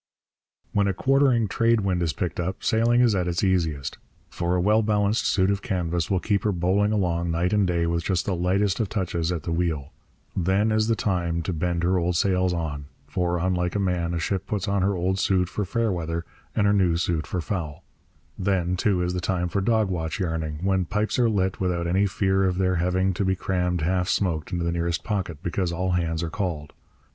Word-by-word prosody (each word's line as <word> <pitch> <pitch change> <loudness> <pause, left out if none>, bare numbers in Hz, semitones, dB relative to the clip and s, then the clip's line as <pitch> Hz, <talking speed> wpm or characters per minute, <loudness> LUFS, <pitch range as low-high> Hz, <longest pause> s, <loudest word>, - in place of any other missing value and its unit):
When 100 -1 +2
a 100 - 0
quartering 130 -2 +3
trade 115 +2 +2
wind 95 -3 0
is 85 -2 +1
picked 90 0 -4
up 95 +2 -3
sailing 120 +1 +3
is 120 -3 +4
at 90 -3 0
its 85 +2 -1
easiest; 80 -7 0 0.3
for 85 +1 -1
a - - +1
well 105 +5 +3
balanced 105 0 +1
suit 95 0 +2
of 100 0 -1
canvas 85 -4 -1
will 95 - +2
keep 100 +1 0
her 105 - +2
bowling 95 +3 +1
along 85 -5 0
night 85 +3 0
and 105 -2 +3
day 85 -1 +1
with 85 0 -1
just 95 -3 0
the 100 - 0
lightest 95 +4 +1
of 110 -4 0
touches 90 -4 -1
at 85 -4 -3
the 85 - -3
wheel. 80 -4 -1 0.4
Then 95 +4 +2
is 110 0 +2
the 115 - +2
time 85 -5 -1
to 90 - -2
bend 85 +1 -1
her 90 +1 +2
old 90 +1 0
sails 90 0 +2
on; 80 -4 -3 0.2
for, 85 +4 -1
unlike 90 +1 0
a - - +1
man, 90 -3 0
a - - -1
ship 95 +3 -2
puts 105 -2 -2
on 100 -1 +1
her 100 +1 +1
old 95 +2 0
suit 95 -2 +2
for 105 +1 -2
fair 115 +3 0
weather 85 -1 -3 0.3
and 105 - +2
her 100 - +4
new 90 -4 +3
suit 85 -2 -1
for 90 - -2
foul. 80 -4 -4 0.6
Then, 90 -2 +1
too, 95 -2 +1
is 90 0 -1
the 90 - -2
time 90 -2 -1
for 100 - -1
dog 110 0 +2
watch 80 +1 -3
yarning, 80 -4 -2
when 95 -1 +1
pipes 105 +6 -1
are 120 -2 +4
lit 95 -3 0
without 90 -2 -1
any 95 +4 +2
fear 95 0 +1
of 90 -1 0
their 95 -1 +1
having 95 +2 +1
to 95 - -1
be 95 0 +1
crammed 90 -2 -1
half 90 +3 0
smoked 85 -4 0
into 90 -2 -1
the 85 - 0
nearest 85 0 -1
pocket 90 -7 -3
because 90 0 -1
all 90 +2 -1
hands 85 -2 0
are 80 - -3
called. 85 -7 -3
90 Hz, 220 wpm, -25 LUFS, 85-100 Hz, 0.6 s, is